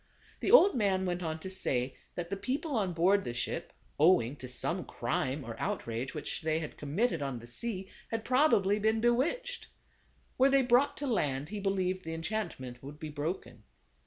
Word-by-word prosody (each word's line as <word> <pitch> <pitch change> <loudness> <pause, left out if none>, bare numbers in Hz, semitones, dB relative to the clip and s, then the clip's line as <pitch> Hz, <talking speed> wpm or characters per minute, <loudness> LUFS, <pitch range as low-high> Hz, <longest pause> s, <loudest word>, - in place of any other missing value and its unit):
The - - -1
old 430 -5 +8
man 195 -5 +1
went 180 0 -1
on 160 -2 -3
to 190 - -5
say 130 -9 -1 0.2
that 175 +1 -4
the - - 0
people 270 +9 -2
on 200 -5 +1
board 185 +4 +3
the 120 - -4
ship, 120 - -3 0.3
owing 145 -6 +5
to 130 - -8
some 125 -1 -1
crime 135 +2 -2
or 115 -2 -6
out - - -2
rage 115 +6 -4
which 150 - -3
they 160 0 +1
had 160 -2 -5
committed 165 +5 0
on 135 -3 -2
the 115 - -10
sea, 190 - -4 0.2
had 225 -1 -3
probably 230 -7 +4
been 220 +1 +2
bewitched. 335 - 0 0.7
Were 265 +2 +6
they 275 -1 +4
brought 250 +3 +3
to 290 - -3
land 145 - 0
he 210 - -4
believed 185 -2 0
the 165 0 -4
enchantment 165 - -4
would 145 +2 -9
be 155 -2 -5
broken. 150 +5 -4
185 Hz, 190 wpm, -31 LUFS, 145-225 Hz, 0.7 s, old